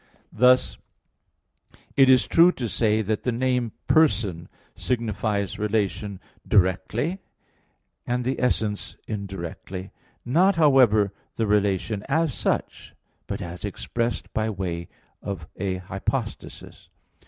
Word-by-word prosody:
Thus 125 +3 +4 1.2
it 135 -1 +6
is 130 -5 +6
true 170 +2 +6
to 120 - -3
say 110 +2 +1
that 110 +1 -1
the 125 - 0
name 125 -1 0
"person" 100 - +2 0.2
signifies 105 -4 -2
relation 105 -2 -1 0.3
directly, 105 - +1 0.9
and 125 0 -1
the 130 +1 -1
essence 110 -4 -1
indirectly; 95 -2 -6 0.3
not, 175 +10 +3
however, 125 - +4 0.2
the 115 - 0
relation 105 0 +1
as 160 -1 +1
such, - - -3 0.3
but - - -4
as 85 +1 -8
expressed 115 +3 -3
by 110 0 0
way 90 -5 -4 0.3
of 90 -6 -5
a 95 -2 -1
hypostasis. 95 +1 -5
110 Hz, 110 wpm, -25 LUFS, 100-125 Hz, 1.2 s, it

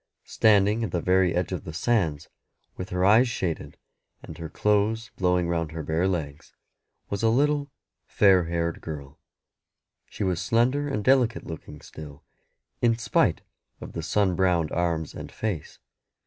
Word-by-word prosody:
Standing 105 +1 +3
at 110 - -2
the 85 - -1
very 90 0 +2
edge 90 0 -1
of - - -4
the 80 - -8
sands, 80 -6 0 0.5
with 90 - -6
her 90 0 0
eyes 115 +5 +5
shaded, 90 -8 -4 0.5
and - - -9
her 80 -1 -6
clothes 105 +5 0
blowing 90 -2 +1
round 85 -2 -2
her 80 -1 -5
bare 80 +5 0
legs, 80 -5 -4 0.6
was 100 - -2
a 115 - +3
little 145 +4 +1 0.4
fair 95 -4 +4
haired 85 0 -2
girl. 75 -1 -8 0.9
She - - -5
was 90 -3 0
slender 130 +5 +1
and 120 -7 -2
delicate 125 -2 +2
looking 75 -2 -9
still, 75 -2 -11 0.6
in 115 -1 +3
spite 115 - +1 0.4
of - - -9
the 85 - -4
sun 90 +3 +1
browned 90 -4 +1
arms 85 -2 -1
and - - -8
face. 100 -9 -4
90 Hz, 155 wpm, -26 LUFS, 80-110 Hz, 0.9 s, eyes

